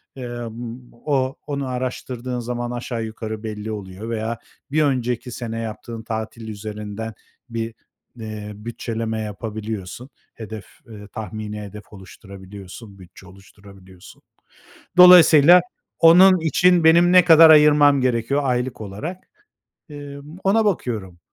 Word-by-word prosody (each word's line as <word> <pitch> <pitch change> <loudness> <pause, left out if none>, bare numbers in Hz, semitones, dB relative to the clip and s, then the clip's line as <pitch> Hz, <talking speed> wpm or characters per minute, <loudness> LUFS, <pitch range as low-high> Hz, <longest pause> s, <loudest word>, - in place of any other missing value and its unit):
Eee, 130 - -7 0.3
m 120 +1 -8 0.3
o 135 -2 0
onu 140 -2 -3
araştırdığın 125 -1 -5
zaman 120 0 -4
aşağı 120 -1 -4
yukarı 110 0 -7
belli 110 0 -6
oluyor 100 +1 -8
veya 115 +1 -3 0.3
bir 155 +1 +2
önceki 125 -3 -2
sene 115 -1 -6
yaptığın 110 +1 -7
tatil 110 0 -6
üzerinden 105 +1 -7 0.4
bir, 115 0 -4 0.5
eee, 110 -1 -7
bütçeleme 110 0 -5
yapabiliyorsun. 110 +2 -7 0.2
Hedef, 110 -3 -9 0.2
eee, 105 -2 -11
tahmini 105 0 -7
hedef 105 +1 -11
oluşturabiliyorsun, 100 +1 -12
bütçe 95 +1 -15
oluşturabiliyorsun. 95 -1 -17 0.8
Dolayısıyla 180 -2 +8 0.4
onun 180 +2 +7
için 175 +2 +3
benim 170 +2 +5
ne 180 -1 +6
kadar 165 -1 +8
ayırmam 150 -2 +6
gerekiyor 125 +3 0
aylık 125 -2 -2
olarak? 110 - -7 0.7
Emm, 145 +2 -10
ona 215 +3 +2
bakıyorum. 110 - -3
115 Hz, 115 wpm, -21 LUFS, 105-140 Hz, 0.8 s, Dolayısıyla